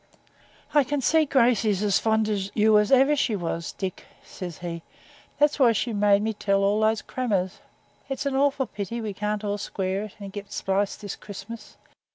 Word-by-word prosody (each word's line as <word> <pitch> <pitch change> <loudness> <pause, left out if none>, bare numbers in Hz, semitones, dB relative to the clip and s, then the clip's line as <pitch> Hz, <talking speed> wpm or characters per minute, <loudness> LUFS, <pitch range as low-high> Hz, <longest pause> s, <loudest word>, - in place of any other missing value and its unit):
'I 295 -2 +5
can 290 +2 -1
see 315 +4 +3
Gracey's 230 -6 +2
as 205 -3 +3
fond 220 -1 +1
of 200 -2 -1
you 215 0 +5
as 210 +3 0
ever 270 +3 +5
she 245 -6 +1
was, 170 -3 -3
Dick,' 190 -2 -5 0.2
says 175 -3 -7
he; 170 -1 -6 0.6
'that's 295 0 +2
why 245 -4 +6
she 230 +2 -1
made 205 0 +3
me 220 0 -1
tell 200 -1 +1
all 205 +2 +2
those 220 0 +2
crammers. 200 -8 -2 0.5
It's 270 +1 -3
an 275 -1 0
awful 275 0 +2
pity 215 +1 -5
we 215 -3 -4
can't 210 +1 -2
all 205 0 -2
square 195 0 -2
it, 215 - -12
and 200 -1 -8
get 205 -1 -8
spliced 195 +1 -1
this 205 -2 -5
Christmas. 220 +3 -10
210 Hz, 190 wpm, -25 LUFS, 200-240 Hz, 0.6 s, why